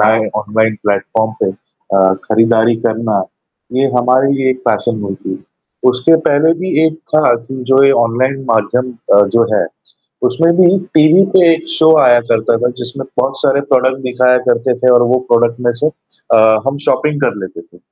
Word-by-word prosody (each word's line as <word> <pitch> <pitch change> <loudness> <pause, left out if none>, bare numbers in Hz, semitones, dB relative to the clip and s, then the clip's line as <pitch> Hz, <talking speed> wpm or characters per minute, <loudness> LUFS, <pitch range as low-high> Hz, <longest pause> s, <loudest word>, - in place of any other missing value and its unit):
लाए 110 +1 +2
online 110 +1 -1
platform 110 +2 -1
पे 95 - +1
अ, 95 0 -2
खरीदारी 115 +1 +2
करना 110 -3 -1 0.5
ये 135 +2 +1
हमारे 130 +3 +2
लिए 135 -1 0
एक 130 - -3
पैशन 115 -3 -1
हुई 100 -1 -5
थी। - - -8 0.5
उसके 125 +6 +2
पहले 150 +3 +2
भी 185 +1 -4 0.2
एक 160 - -2 0.2
था 150 -6 +3
कि 115 +3 -11 0.2
जो 135 +1 +4
ये 140 - +5
ऑनलाइन 130 +4 -2
माध्यम 120 +4 -1 0.2
अ, 100 - +6
जो 115 - +4
है - - 0 0.6
उसमें 165 +7 +1
भी 185 +1 +4 0.2
टीवी 155 +5 +5
पे 180 -3 +5
एक 165 +1 -6
शो 160 -1 +2
आया 120 -2 +4
करता 115 0 +1
था 120 +1 -1
जिसमें 125 +2 -7
बहुत 135 0 -2
सारे 140 +1 +1
प्रोडक्ट 130 0 +2
दिखाया 125 0 +1
करते 120 +1 +1
थे 125 0 +3
और 120 - +4
वो 130 - +2
प्रोडक्ट 120 0 +2
में 120 - +3
से 150 - +2 0.5
अ, 110 -1 +4
हम 135 +1 -2
शॉपिंग 150 +2 0
कर 135 - 0
लेते 85 - -11
थे। - - -22
125 Hz, 180 wpm, -13 LUFS, 110-135 Hz, 0.6 s, अ